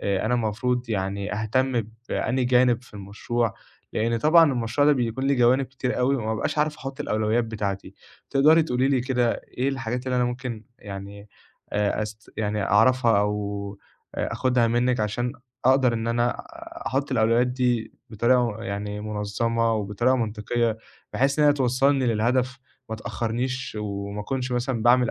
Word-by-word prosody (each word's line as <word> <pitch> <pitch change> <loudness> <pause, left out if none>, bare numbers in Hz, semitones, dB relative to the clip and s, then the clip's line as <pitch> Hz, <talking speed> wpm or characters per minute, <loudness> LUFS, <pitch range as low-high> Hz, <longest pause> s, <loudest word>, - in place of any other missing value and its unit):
آآ 100 +1 0
أنا 125 - +2
المفروض 120 +2 -1
يعني 100 0 -2
أهتم 120 +3 0 0.3
بأنهي 130 0 0
جانب 125 -1 +3
في 120 - -18
المشروع، 105 +3 -2 0.4
لإن 115 +1 0
طبعًا 155 +2 +5
المشروع 120 +4 +1
ده 150 - +6
بيكون 125 0 -1
ليه 140 - +2
جوانب 125 +2 +4
كتير 130 -2 -3
أوي 135 +2 +2
وما 110 -2 -2
أبقاش 110 +6 -2
عارف 150 0 +1
أحُط 135 +2 -7
الأولويات 110 -2 +1
بتاعتي. 100 -3 -4 0.4
تقدري 155 +4 +5
تقولي 130 -2 +1
لي 135 -2 +2
كده 125 -2 +1 0.3
إيه 130 - +2
الحاجات 125 -2 -3
اللي 125 -1 0
أنا 125 - +2
ممكن 120 -2 -4
يعني 100 +1 -9 0.4
آآ 105 +1 0
أس 110 +1 -8
يعني 105 -1 -1
أعرفها 115 +1 +4
أو 100 -1 -3 0.4
آآ - - -2
آخُدها 125 -2 +2
منِّك 120 +1 +1
عشان 115 +4 -1 0.3
أقدر 130 -1 +4
إن 115 0 -2
أنا 120 +1 +2 0.6
أحُط 135 +2 -1
الأولويات 115 +2 +3
دي 125 -3 0 0.2
بطريقة 115 0 +1
يعني 105 -1 -4
مُنظّمة 110 +2 -1
وبطريقة 110 +5 +1
منطقيّة 115 0 -1 0.3
بحيث 140 +3 +1
إن 150 - +5
هي 145 - +6
توصّلني 135 0 +2
للهدف 125 +3 +1 0.3
ما 110 - -3
تأخّرنيش، 115 +3 -3
وما 100 0 -4
أكونش 130 +3 -3
مثلًا 120 -1 -1
باعمل 120 +1 +4
120 Hz, 155 wpm, -25 LUFS, 105-130 Hz, 0.6 s, ده